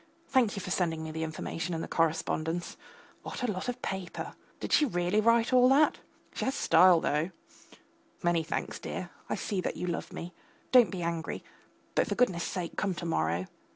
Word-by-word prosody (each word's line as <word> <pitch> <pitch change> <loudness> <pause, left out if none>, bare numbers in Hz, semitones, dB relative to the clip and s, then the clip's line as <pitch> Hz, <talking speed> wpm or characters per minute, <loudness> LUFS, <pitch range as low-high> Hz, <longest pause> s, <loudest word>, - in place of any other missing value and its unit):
Thank 245 -6 +3
you 200 - -4
for 180 - -5
sending 165 -4 0
me 160 - -5
the 160 +1 -4
information 165 +2 -3
and 160 - -3
the - - -5
correspondence. 165 +1 0 0.5
What - - -6
a 245 - +1
lot 190 +5 -3
of 245 0 -5
paper. 190 -2 -4 0.3
Did - - -3
she - - +6
really 180 -4 +1
write 230 +2 +3
all 250 0 +7
that? 290 +3 +4 0.3
She - - -3
has 265 - 0
style 185 -8 +6
though; 155 +2 0 0.9
many 175 -1 +3
thanks, 160 - -3
dear; - - -5 0.2
I - - 0
see 200 -4 -2
that - - -3
you - - -3
love 175 -1 -3
me. 175 +2 -7 0.4
Don't 245 -6 +7
be 180 -1 -4
angry, 165 -1 -3 0.5
but, - - +2
for - - -1
goodness 185 -9 +2
sake, 180 -3 -4
come 195 -3 0
to 170 - -5
morrow. 85 - 0
180 Hz, 190 wpm, -30 LUFS, 165-220 Hz, 0.9 s, all